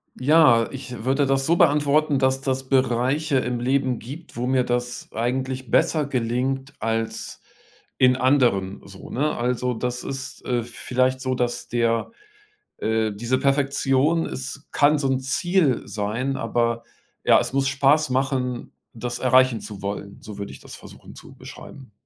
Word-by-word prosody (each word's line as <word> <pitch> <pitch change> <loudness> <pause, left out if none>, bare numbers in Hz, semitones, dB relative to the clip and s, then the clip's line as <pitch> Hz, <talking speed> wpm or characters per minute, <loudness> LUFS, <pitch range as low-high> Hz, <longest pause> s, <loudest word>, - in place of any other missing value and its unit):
Ja, 130 -5 +5
ich 125 -4 -8
würde 135 +2 +2
das 135 0 +1
so 170 - +3
beantworten, 145 0 +3
dass 130 0 +1
das 135 -1 -2
Bereiche 135 +3 +1
im 125 -2 -1
Leben 130 -1 0
gibt, 145 +8 -10
wo 120 +2 -2
mir 130 -1 +2
das 120 0 -3
eigentlich 130 +2 -2
besser 155 +5 +2
gelingt 130 +2 -2
als 115 0 -3 0.6
in 125 0 +5
anderen 125 -8 +2
so, 100 -1 -12
ne? 150 +4 -1
Also, 125 +1 -1
das 125 +1 -3
ist, 135 -1 -6
äh, 120 -2 0
vielleicht 130 +2 -1
so, 130 -1 -1
dass 120 -1 -2
der 115 - 0 0.7
äh, 110 0 0
diese 120 +5 -1
Perfektion, 140 +3 +2
es 135 +2 -7
kann 145 +1 +3
so 140 - 0
'n 135 - +2
Ziel 135 +1 +1
sein, 115 +6 -2
aber, 115 0 -1 0.4
ja, - - +6
es - - -3
muss 135 0 +1
Spaß 140 +3 +3
machen, 130 -2 -1 0.2
das 120 +1 -4
erreichen 130 -2 +4
zu 105 -2 -9
wollen. 100 0 -5
So 105 -2 -9
würde 100 - -5
ich - - -12
das - - -11
versuchen - - -14
zu - - -13
beschreiben. 135 -5 -12
130 Hz, 155 wpm, -23 LUFS, 120-135 Hz, 0.7 s, ja